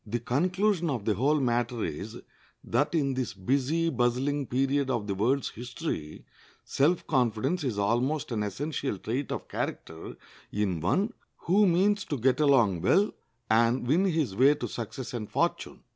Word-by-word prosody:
The 115 +3 -1
conclusion 180 - +1
of 120 -8 -3
the 110 - +2
whole 140 +9 +2
matter 120 -2 0
is, 105 +10 -6 0.4
that 150 +3 0
in 140 -4 +1
this 130 -5 -3
busy, 140 - 0
bustling 130 +2 0
period 135 +2 0
of 120 -5 -1
the 100 - -2
world's 125 +8 0
history 120 - -6 0.4
self 165 +6 +1
confidence 125 - 0
is 125 -7 -2
almost 120 +9 0
an 110 -3 -1
essential 135 +3 -3
trait 125 +8 -3
of - - -4
character 80 0 -5 0.4
in 100 -5 -1
one 195 - +1 0.3
who 200 +4 +4
means 195 +4 +2
to 145 - -3
get 130 +4 +2
along 115 - +3
well 205 - +3 0.3
and 115 +3 +2
win 160 +10 +3
his 155 - 0
way 135 +6 +5
to 120 - -4
success 120 +4 -6
and 110 -4 -5
fortune. - - -2
130 Hz, 160 wpm, -28 LUFS, 110-150 Hz, 0.4 s, way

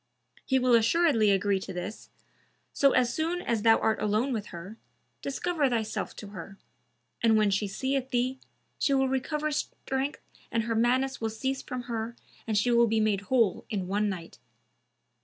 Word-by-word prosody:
He 265 - +2
will 255 -1 +3
assuredly 230 -1 +4
agree 195 0 +2
to 190 0 -7
this, 180 +4 -6 0.6
so 275 -1 +4
as 240 -1 +2
soon 330 +4 -1
as 235 - -1
thou 225 +1 +6
art 220 - 0
alone 215 +6 +1
with 210 -3 -3
her, 185 +6 -9 0.4
discover 295 0 0
thyself 220 -3 -2
to 205 - -9
her; 195 0 -9 0.6
and 225 -1 +4
when 210 -2 +3
she 205 +1 0
seeth 265 +6 -2
thee, 255 +1 0 0.4
she 280 - +2
will 270 0 +3
recover 300 +4 -1
strength 275 0 -3 0.3
and 230 - +1
her 230 0 -1
madness 255 +4 +1
will 225 - 0
cease 265 +5 -2
from 250 -1 -5
her 235 -1 -4 0.3
and 215 -2 +1
she 240 +4 +2
will 235 0 +5
be 220 0 +1
made 215 -2 +1
whole 230 -7 +2
in 195 -5 -2
one 205 +2 +1
night. 175 -4 -7
230 Hz, 175 wpm, -28 LUFS, 210-265 Hz, 0.6 s, thou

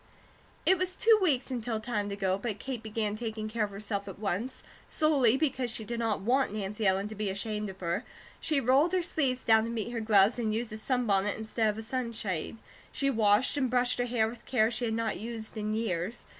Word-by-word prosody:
It 375 -1 +4
was 370 0 -1
two 445 -1 +5
weeks 280 -8 +1
until 235 -3 -2
time 210 -3 -2
to 200 - -3
go, 190 -2 +1
but 215 -1 -3
Kate 255 0 -5
began 215 -1 -2
taking 220 -1 -4
care 215 0 -1
of - - -8
herself 200 0 -4
at 195 - -7
once, 215 +5 -3 0.2
solely 275 -6 +3
because 265 -4 0
she 225 -1 -3
did 235 +2 -4
not 225 -4 0
want 255 +5 +2
Nancy 210 0 -2
Ellen 190 +2 +2
to - - -6
be 210 -1 -2
ashamed 210 +1 -2
of 190 0 -11
her. 175 +6 -1 0.4
She 305 -3 +1
rolled 275 +7 +3
her 365 -1 +2
sleeves 265 -6 0
down 220 -1 +5
to - - -4
meet 230 0 -3
her 235 -2 -3
gloves 215 +1 +4
and 215 -2 0
used 230 -1 -2
a - - -5
sunbonnet 210 -5 +1
instead 220 0 0
of 210 - -2
a 220 - -5
sunshade. 225 -6 -3 0.3
She 275 0 0
washed 220 +3 +3
and 260 -3 +1
brushed 245 0 +2
her 245 - +1
hair 230 -2 +2
with 230 +2 -9
care 225 -3 +3
she 240 - -1
had 220 -1 -1
not 225 -2 -1
used 225 0 -6
in 215 0 -2
years. 220 0 -2
225 Hz, 225 wpm, -30 LUFS, 210-245 Hz, 0.4 s, two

